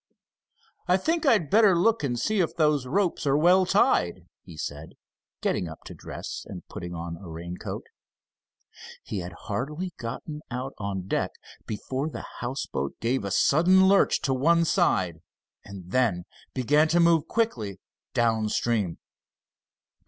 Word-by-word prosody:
"I 180 +1 +4
think 320 - 0
I'd 210 - +3
better 210 -4 +6
look 220 +6 +3
and 120 -4 -1
see 215 - 0
if 175 - 0
those 150 -5 +2
ropes 175 +1 0
are 140 +1 +4
well 180 +4 +5
tied," 90 - +2 0.2
he 85 -4 -12
said, 75 +1 -6 0.5
getting 90 - 0
up 80 - -11
to - - -9
dress, - - -7
and - - -10
putting 85 0 -7
on 85 0 -5
a 90 -1 -11
raincoat. 85 +2 -6 1.2
He 105 - -4
had 90 -1 -6
hardly 150 - -4
gotten 140 +6 -6
out 130 +2 -4
on 95 -2 -4
deck, - - 0 0.4
before 130 +7 -3
the - - -7
houseboat 120 - -3
gave 120 0 0
a 100 - -3
sudden 180 - +5
lurch 195 0 +4
to 135 - +1
one 165 +6 +3
side, 90 - +1 0.4
and 95 -3 -10
then 110 -8 +2 0.3
began 150 +5 +3
to 170 +2 +2
move 165 -2 +4
quickly 115 - -1 0.4
down 110 -2 +2
stream. 105 -7 0
130 Hz, 145 wpm, -26 LUFS, -, 1.2 s, better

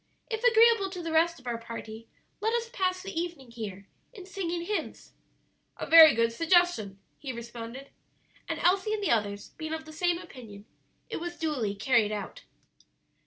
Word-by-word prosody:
If 445 +1 -3
agreeable 460 -4 +5
to 365 -2 -7
the 330 - -4
rest 330 +1 +3
of 255 - -21
our 235 -1 -3
party, 230 -1 -8 0.3
let 445 +3 0
us 465 0 -2
pass 370 -4 -1
the 390 - -7
evening 330 -7 -5
here 200 -4 -7 0.3
in 390 -6 -11
singing 350 -3 -3
hymns." 415 +4 -4 0.7
"A - - -4
very 320 -2 +9
good 230 0 +1
suggestion," 330 - +2 0.2
he 275 - -5
responded, 235 +2 -8 0.6
and - - -2
Elsie 380 +4 +2
and 415 - -5
the - - +1
others 205 -3 -1
being 315 0 -3
of 320 0 -8
the 310 - -11
same 350 +2 +1
opinion, 235 - -11 0.4
it - - -4
was 345 +1 -6
duly 260 -11 -2
carried 215 0 +2
out. 205 -2 -6
320 Hz, 170 wpm, -28 LUFS, 230-370 Hz, 0.7 s, very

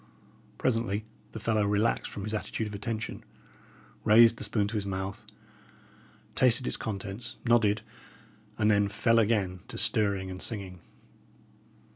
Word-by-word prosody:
Presently 110 -4 0 0.3
the 110 - -6
fellow 110 -1 +1
relaxed 105 +3 +1
from 100 - -6
his 110 +1 -4
attitude 110 +1 -3
of 105 - -6
attention, 110 +2 -4 0.8
raised 115 +1 +7
the - - -6
spoon 105 -3 +1
to - - -7
his 105 -2 -1
mouth, 95 0 -4 1.1
tasted 125 0 +3
its - - 0
contents, 105 +2 -5
nodded, 110 -3 +3 0.7
and 110 -1 +3
then 100 -1 +3
fell 115 +3 +2
again 100 -5 +1
to - - -8
stirring 100 -4 +1
and 95 - -7
singing. 95 -5 -5
105 Hz, 135 wpm, -29 LUFS, 100-115 Hz, 1.1 s, raised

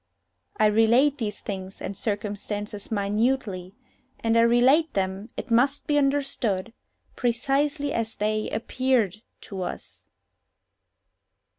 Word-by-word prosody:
I 215 - +4
relate 230 +7 +4
these 210 -3 -3
things 190 -1 -6
and 195 - -5
circumstances 205 0 -4
minutely, 205 -2 -1 0.4
and 225 0 +1
I 230 - +6
relate 255 +7 +4
them, 195 +3 -2
it 245 - -6
must 270 +5 +3
be 295 - +1
understood, 275 -8 0 0.4
precisely 280 +4 0
as 225 -1 -2
they 215 +1 -1
_appeared_to 220 -4 -1
us. - - -7
225 Hz, 105 wpm, -26 LUFS, 205-265 Hz, 0.4 s, I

